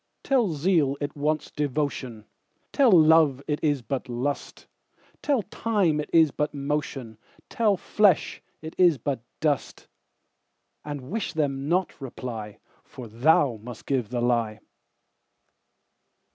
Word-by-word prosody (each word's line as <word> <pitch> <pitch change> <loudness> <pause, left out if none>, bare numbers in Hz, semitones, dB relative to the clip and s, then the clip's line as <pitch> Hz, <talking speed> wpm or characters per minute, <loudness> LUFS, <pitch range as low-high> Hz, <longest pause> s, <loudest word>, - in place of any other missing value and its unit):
Tell 240 -10 +2
zeal 150 -3 +1
it 145 0 -4
wants 150 +1 -1
devotion; 140 -6 -3 0.5
Tell 275 -4 +4
love 160 -5 +5
it 150 -1 -2
is 145 -5 +1
but 130 +3 -4
lust; 130 +4 -4 0.6
Tell 275 -7 +1
time 200 -8 0
it 150 - -4
is 160 -3 +5
but 150 +1 -2
motion; 140 -5 -4 0.3
Tell 215 -4 +1
flesh 200 -2 +2 0.2
it 160 - -7
is 175 -5 +5
but 130 0 -3 0.2
dust:And 145 - -6
wish 220 0 -3
them 140 -2 -1
not 180 -3 0
reply, 115 -5 -7 0.3
For 125 -4 -10
thou 120 +1 +2
must 120 0 -10
give 130 -6 -1
the 120 -1 -2
lie. 115 -3 0
145 Hz, 120 wpm, -25 LUFS, 125-160 Hz, 0.6 s, love